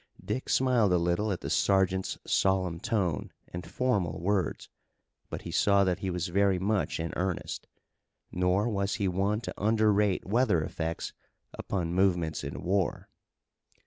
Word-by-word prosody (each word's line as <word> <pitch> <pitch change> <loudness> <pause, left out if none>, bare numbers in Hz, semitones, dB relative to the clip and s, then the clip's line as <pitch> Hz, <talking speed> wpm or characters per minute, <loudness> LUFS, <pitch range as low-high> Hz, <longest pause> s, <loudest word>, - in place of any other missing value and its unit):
Dick 130 - -3
smiled 125 -6 +3
a 90 - +4
little 85 +5 0
at 90 - -3
the - - -4
sergeant's 95 -1 +2
solemn 95 -3 +1
tone, 90 -6 -1 0.2
and 85 -1 -7
formal 100 -11 0
words, 95 -1 -1 0.6
but - - -6
he - - -6
saw 100 -1 +4
that 95 -1 0
he 95 -1 -2
was 90 0 -2
very 100 +1 +3
much 100 0 0
in 80 0 -3
earnest. 90 -1 -3 0.6
Nor 90 +4 +1
was 100 -3 -1
he 100 -3 0
one 100 +4 0
to - - -5
underrate 105 -2 +2
weather 105 -6 +2
effects 80 +1 -4 0.4
upon 85 -4 -3
movements 90 -4 +1
in - - -6
war. 95 0 0
95 Hz, 145 wpm, -29 LUFS, 90-105 Hz, 0.6 s, a